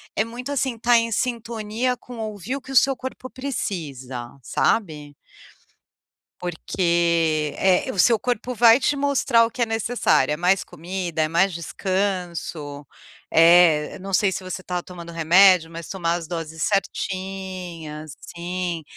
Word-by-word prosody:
é 215 Hz, -, +2 dB
muito, 245 Hz, +5 st, -6 dB
assim, 265 Hz, -3 st, -1 dB
estar 235 Hz, +1 st, +4 dB
em 230 Hz, 0 st, 0 dB
sintonia 235 Hz, +1 st, -2 dB
com 245 Hz, +1 st, -11 dB
ouvir 215 Hz, +2 st, -4 dB
o 280 Hz, -, -6 dB
que 265 Hz, -, -11 dB
o 270 Hz, -, +3 dB
seu 270 Hz, +1 st, +5 dB
corpo 255 Hz, 0 st, -7 dB
precisa, 140 Hz, -, -5 dB
sabe? 150 Hz, -, -1 dB, 1.2 s
Porque 170 Hz, -3 st, 0 dB
é, 185 Hz, -1 st, +2 dB
o 190 Hz, -, -6 dB
seu 230 Hz, +1 st, +5 dB
corpo 245 Hz, 0 st, -2 dB
vai 235 Hz, +1 st, +6 dB
te 285 Hz, +3 st, +1 dB
mostrar 275 Hz, -4 st, +3 dB
o 230 Hz, -, -5 dB
que 250 Hz, -, -5 dB
é -, -, +4 dB
necessário, 225 Hz, -, +1 dB
é -, -, -3 dB
mais 180 Hz, +3 st, +2 dB
comida, 175 Hz, 0 st, -4 dB
é 155 Hz, -, +2 dB
mais 175 Hz, +4 st, +2 dB
descanso, 170 Hz, -5 st, -3 dB, 0.5 s
é 165 Hz, -2 st, +5 dB
não 195 Hz, +1 st, -7 dB
sei 195 Hz, +1 st, +3 dB
se 185 Hz, 0 st, -4 dB
você 185 Hz, 0 st, -5 dB
tá 180 Hz, -1 st, -3 dB
tomando 170 Hz, -2 st, -10 dB
remédio, 170 Hz, +1 st, +5 dB
mas 165 Hz, -1 st, -8 dB
tomar 170 Hz, -3 st, -1 dB
as 170 Hz, -2 st, -5 dB
doses 160 Hz, -2 st, -6 dB
certinhas 185 Hz, -6 st, -4 dB
sim, 175 Hz, -1 st, -4 dB
185 Hz, 150 wpm, -23 LUFS, 165-230 Hz, 1.2 s, vai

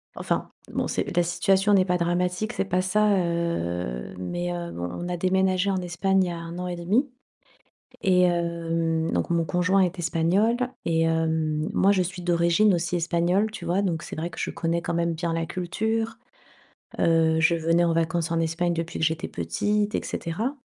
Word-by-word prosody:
enfin, -, -, -2 dB, 0.2 s
bon, -, -, -1 dB
c'est -, -, -2 dB
la 175 Hz, -, +4 dB
situation 195 Hz, +3 st, +2 dB
n'est 190 Hz, -2 st, +5 dB
pas 180 Hz, -1 st, +1 dB
dramatique 180 Hz, +5 st, -1 dB
c'est -, -, -1 dB
pas 185 Hz, -1 st, +1 dB
ça, 205 Hz, +2 st, +2 dB
heu, 90 Hz, -, -2 dB
mais 175 Hz, -, -3 dB
heu, 170 Hz, -1 st, -5 dB
on 85 Hz, 0 st, -4 dB
on -, -, -4 dB
a 175 Hz, -, -2 dB
déménagé 185 Hz, +1 st, +2 dB
en 190 Hz, -, 0 dB
Espagne 190 Hz, +2 st, +1 dB
il -, -, -1 dB
y -, -, -3 dB
a 170 Hz, -, -5 dB
1 170 Hz, +1 st, -7 dB
an 180 Hz, -, -3 dB
1/2. 180 Hz, -, 0 dB, 0.9 s
Et 180 Hz, -1 st, +4 dB
hem, 165 Hz, -2 st, 0 dB
donc -, -, -1 dB
mon 170 Hz, -1 st, +1 dB
conjoint 180 Hz, +4 st, +2 dB
est 185 Hz, 0 st, 0 dB
espagnol 175 Hz, +7 st, +2 dB, 0.3 s
et 165 Hz, -1 st, +2 dB
hem, 160 Hz, -1 st, 0 dB
moi 195 Hz, -, +4 dB
je 195 Hz, -2 st, +3 dB
suis 180 Hz, 0 st, -4 dB
d'origine 175 Hz, +4 st, +3 dB
aussi 175 Hz, +1 st, -2 dB
espagnole, 175 Hz, +5 st, +1 dB
tu 220 Hz, -, -8 dB
vois? 180 Hz, +3 st, +1 dB
Donc 170 Hz, -5 st, -1 dB
c'est -, -, -7 dB
vrai 165 Hz, +2 st, -3 dB
que -, -, -13 dB
je -, -, -2 dB
connais 170 Hz, +1 st, -1 dB
quand -, -, -3 dB
même 170 Hz, 0 st, 0 dB
bien 165 Hz, +1 st, -2 dB
la 165 Hz, 0 st, -1 dB
culture. 220 Hz, +6 st, -2 dB, 0.8 s
Heu, 160 Hz, -1 st, +3 dB
je 160 Hz, +1 st, +4 dB
venais 165 Hz, +1 st, +2 dB
en 170 Hz, -, +2 dB
vacances 165 Hz, 0 st, 0 dB
en 165 Hz, -, +1 dB
Espagne 165 Hz, +2 st, 0 dB
depuis 165 Hz, 0 st, -4 dB
que 160 Hz, -, +2 dB
j'étais 160 Hz, +2 st, -1 dB
petite 210 Hz, 0 st, -1 dB
et -, -, -1 dB
cetera. 220 Hz, -, -3 dB
175 Hz, 195 wpm, -25 LUFS, 165-185 Hz, 0.9 s, n'est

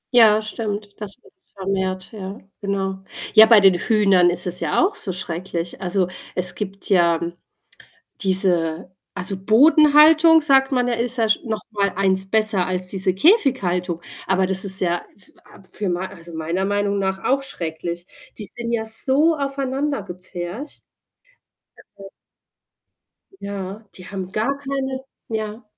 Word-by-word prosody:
Ja, 220 Hz, -2 st, +6 dB
stimmt, 210 Hz, -1 st, -6 dB
das 205 Hz, -2 st, -6 dB
wird's 380 Hz, -3 st, -25 dB
vermehrt, 190 Hz, -1 st, -3 dB
ja, 200 Hz, -1 st, -8 dB, 0.2 s
genau. 195 Hz, -1 st, -3 dB, 0.3 s
Ja, 220 Hz, 0 st, +8 dB
bei 225 Hz, -2 st, +7 dB
den 195 Hz, -1 st, +6 dB
Hühnern 195 Hz, -2 st, +3 dB
ist 175 Hz, 0 st, 0 dB
es 180 Hz, 0 st, -4 dB
ja -, -, 0 dB
auch 400 Hz, -, -2 dB
so 200 Hz, -, -1 dB
schrecklich. 175 Hz, 0 st, -5 dB
Also, 185 Hz, 0 st, +1 dB, 0.3 s
es 180 Hz, -1 st, +3 dB
gibt 195 Hz, -1 st, -6 dB
ja 170 Hz, -4 st, +3 dB, 1.0 s
diese 180 Hz, -3 st, +1 dB, 0.2 s
also 190 Hz, +1 st, +1 dB
Bodenhaltung, 310 Hz, -, +6 dB
sagt 270 Hz, -2 st, +3 dB
man 250 Hz, -2 st, +1 dB
ja, 245 Hz, -, 0 dB
ist 240 Hz, +2 st, +1 dB
ja 225 Hz, -1 st, +1 dB
sch 215 Hz, -, +2 dB
noch 220 Hz, -2 st, -4 dB
mal 200 Hz, -3 st, -1 dB
1 190 Hz, 0 st, 0 dB
besser 215 Hz, -3 st, +1 dB
als 185 Hz, 0 st, -3 dB
diese 190 Hz, 0 st, -2 dB
Käfighaltung. 190 Hz, -, +1 dB, 0.3 s
Aber 190 Hz, 0 st, +2 dB
das 190 Hz, +1 st, +4 dB
ist 190 Hz, -1 st, +2 dB
ja 175 Hz, -1 st, -1 dB, 0.2 s
für 190 Hz, -, -9 dB
a -, -, -18 dB
für 205 Hz, -3 st, -3 dB
mei 180 Hz, +2 st, -2 dB
also 170 Hz, -3 st, -12 dB
meiner 165 Hz, +4 st, -2 dB
Meinung 205 Hz, 0 st, -1 dB
nach 190 Hz, 0 st, -1 dB
auch 275 Hz, +1 st, +1 dB
schrecklich. 170 Hz, -6 st, -6 dB, 0.3 s
Die 210 Hz, -, -7 dB
sind 235 Hz, +5 st, -7 dB
ja 225 Hz, -1 st, -1 dB
so 275 Hz, +8 st, +5 dB
aufeinander 275 Hz, 0 st, -3 dB
gepfercht, 180 Hz, -, -8 dB, 1.1 s
also 195 Hz, 0 st, -12 dB, 1.3 s
Ja, 200 Hz, +1 st, -7 dB
die 185 Hz, -, -12 dB
haben 190 Hz, -2 st, -6 dB
gar 230 Hz, +7 st, -1 dB
keine 270 Hz, -1 st, -4 dB, 0.2 s
ja. 220 Hz, +1 st, -5 dB
200 Hz, 150 wpm, -21 LUFS, 185-235 Hz, 1.3 s, Ja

